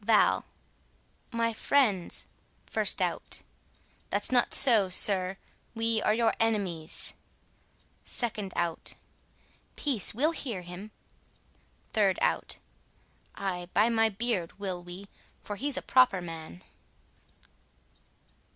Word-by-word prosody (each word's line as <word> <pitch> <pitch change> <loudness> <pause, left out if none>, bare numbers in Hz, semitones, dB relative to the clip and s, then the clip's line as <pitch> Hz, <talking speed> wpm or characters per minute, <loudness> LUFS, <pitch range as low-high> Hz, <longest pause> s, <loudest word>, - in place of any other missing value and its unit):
Val: 215 0 +3 0.9
My 230 -1 0
friends,— 220 -7 +1 0.5
1st - - +3
Out: - - -1 0.7
That's - - +1
not 245 -1 +3
so, 225 -8 +6
sir, 185 0 +3 0.4
we 225 -1 0
are - - +2
your 230 0 +2
enemies. 195 -8 0 0.9
2d 210 -5 -1
Out: 170 -2 -2 0.8
Peace! 260 -10 +2
we'll 290 +9 +2
hear 235 - -4
him. 180 +4 -9 1.0
3d 200 -4 +2
Out: 80 -1 0 0.8
Ay, 180 -3 -4
by 215 +3 +4
my 225 -1 +3
beard, 205 -5 -3
will 190 -3 -4
we; 180 +3 -10 0.4
For 205 - -5
he's 280 +5 +1
a - - -2
proper 255 -7 +4
man. 160 - -9
205 Hz, 105 wpm, -29 LUFS, 180-230 Hz, 1.0 s, so